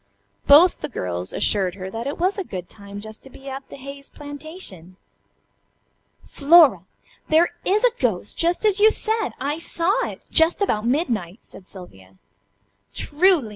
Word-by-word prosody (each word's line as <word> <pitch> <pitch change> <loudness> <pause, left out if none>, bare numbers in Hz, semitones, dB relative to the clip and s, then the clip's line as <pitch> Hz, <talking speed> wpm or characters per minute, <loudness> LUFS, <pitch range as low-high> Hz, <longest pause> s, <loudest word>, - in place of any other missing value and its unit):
Both 325 +6 +6
the 295 - -4
girls 90 - -4
assured 190 -4 0
her 190 -1 -7
that 230 +4 -5
it 285 - -4
was 375 +4 0
a - - -2
good 180 - -7
time 200 +1 -11
just 220 0 -9
to 270 - -15
be 270 +1 -14
at 270 0 -7
the - - -10
Hayes 275 +1 -10
plantation. 285 - -9 1.3
"Flora! 280 - +5 0.4
There 320 +2 +4 0.2
is 410 +4 +1
a - - +5
ghost! 210 -6 -1
Just 345 +5 +1
as 410 -2 +3
you 430 +1 +7
said! 440 0 -1
I 295 +3 -3
saw 370 +8 0
it. - - -10
Just 320 +1 +4
about 225 - 0
midnight," 235 - -2
said 185 - -15
Sylvia. 95 - -14 0.8
"Truly!" 315 - +2
275 Hz, 160 wpm, -22 LUFS, -, 1.3 s, you